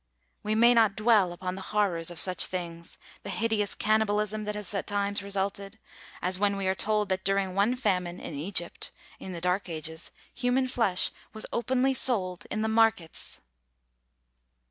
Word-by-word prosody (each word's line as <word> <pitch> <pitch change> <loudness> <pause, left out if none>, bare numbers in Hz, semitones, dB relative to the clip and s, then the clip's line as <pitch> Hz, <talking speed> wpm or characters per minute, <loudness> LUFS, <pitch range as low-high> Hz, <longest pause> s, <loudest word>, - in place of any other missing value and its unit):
We 215 +1 -1
may 235 +2 +6
not 220 -4 +4
dwell 215 -4 +4
upon 180 +1 -4
the 190 - -7
horrors 190 -5 0
of 175 - -8
such 185 -1 +4
things 170 -2 -6 0.2
the - - -7
hideous 220 -3 0
cannibalism 215 0 +1
that 210 0 -3
has 210 -1 -2
at 195 - -3
times 205 0 0
resulted; 200 +1 -3 0.5
as 185 +1 0
when 200 0 +2
we 195 - -2
are 190 - +2
told 210 +1 +1
that 190 0 -1
during 195 -1 +1
one 205 +6 +2
famine 180 -7 -1
in - - -7
Egypt, 170 +4 -2 0.3
in 190 - -7
the 170 -2 -6
dark 180 +2 0
ages, 160 0 -4 0.2
human 255 +1 +1
flesh 225 -8 +1 0.2
was 220 - -3
openly 260 +2 +1
sold 190 -9 +1
in 215 +1 -1
the - - +1
markets! 220 -6 +1
200 Hz, 165 wpm, -28 LUFS, 185-220 Hz, 0.5 s, may